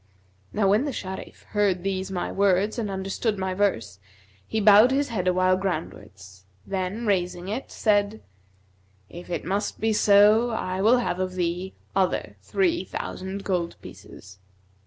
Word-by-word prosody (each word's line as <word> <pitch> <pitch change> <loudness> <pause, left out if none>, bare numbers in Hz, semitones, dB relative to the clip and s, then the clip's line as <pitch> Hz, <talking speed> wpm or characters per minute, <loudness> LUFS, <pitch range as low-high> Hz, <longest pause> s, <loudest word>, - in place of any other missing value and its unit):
Now 205 -2 +1
when 215 +7 +3
the 285 - -2
Sharif 190 -3 -7
heard 200 -4 +1
these 190 -1 -2
my 180 -2 -3
words 200 +3 +1
and 215 -3 -2
understood 195 +3 -2
my 190 -1 -2
verse, 115 - -1 0.5
he 220 - -1
bowed 210 +3 +7
his 280 +1 0
head 190 -6 -2
awhile 185 0 +3
groundwards 95 - -6 0.2
then 195 +4 -3
raising 180 -2 -1
it, 220 +6 -4
said, 210 0 +1 0.9
'If 175 +1 -10
it 175 - -3
must 200 +4 -2
be 220 0 +1
so, 210 +3 +5
I 190 -4 -3
will 225 +5 +5
have 210 -7 -2
of 185 0 -2
thee 180 +1 -2 0.2
other 190 -1 0
three 350 -3 0
thousand 190 +1 -6
gold 180 -4 -2
pieces.' 95 0 -13
195 Hz, 150 wpm, -25 LUFS, 185-210 Hz, 0.9 s, bowed